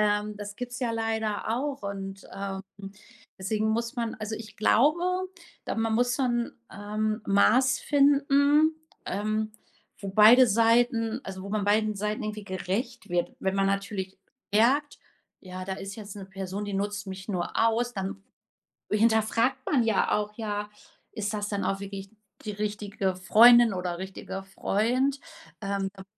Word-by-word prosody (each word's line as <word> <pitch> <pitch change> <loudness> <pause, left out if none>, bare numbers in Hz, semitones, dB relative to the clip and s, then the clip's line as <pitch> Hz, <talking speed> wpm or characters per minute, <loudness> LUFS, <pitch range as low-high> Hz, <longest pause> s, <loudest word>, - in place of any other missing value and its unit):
Ähm, 210 0 +1
das 205 0 -7
gibt's 245 0 -6
ja 240 -3 -1
leider 220 -2 -2
auch 280 -1 -3
und, 195 -1 -6
ähm, 195 -1 -5 0.7
deswegen 215 +3 -1
muss 230 +2 -2
man 230 -1 -2
also 220 0 -5
ich 215 -2 -10
glaube, 290 +10 +3 0.6
da - - -3
man 225 0 0
muss 245 +2 +2
so 270 - -1
'n, 240 -1 0 0.2
ähm, 215 +2 -2
Maß 255 +6 +4
finden, 285 +2 +4 0.3
ähm, 215 +2 -1 0.5
wo 200 - -6
beide 225 +6 +8
Seiten 230 +1 +2
also 190 -1 -7
wo 200 - -7
man 210 -1 -1
beiden 215 0 +2
Seiten 210 +4 -2
irgendwie 215 -1 -5
gerecht 200 +5 -4
wird. 175 0 -1
Wenn 195 0 -1
man 195 0 +2
natürlich 195 -1 -2 0.4
merkt: 275 +7 +3 0.4
„Ja, 185 0 -7
da 190 - -4
ist 195 +2 -6
jetzt 205 -2 -8
'ne 195 -2 -8
Person, 195 +1 -5
die 205 -1 -4
nutzt 205 0 -3
mich 190 0 -7
nur 180 -4 -2
aus,“ 230 +2 +2
dann 195 -1 -5 0.7
hinterfragt 225 +3 +2
man 270 -5 +2
ja 220 -3 +1
auch: 210 0 -1
„Ja, 210 -2 -3 0.4
ist 215 -1 -3
das 205 -1 -2
dann 200 -1 -2
auch 195 0 -1
wirklich 195 0 -7 0.3
die 210 - -2
richtige 205 -2 -2
Freundin 230 +4 +7
oder 180 -1 -3
richtiger 190 +1 -6
Freund?“ 245 +8 0 0.4
Ähm, 195 -1 -2
da 190 - -11
muss - - -31
210 Hz, 160 wpm, -27 LUFS, 195-230 Hz, 0.7 s, beide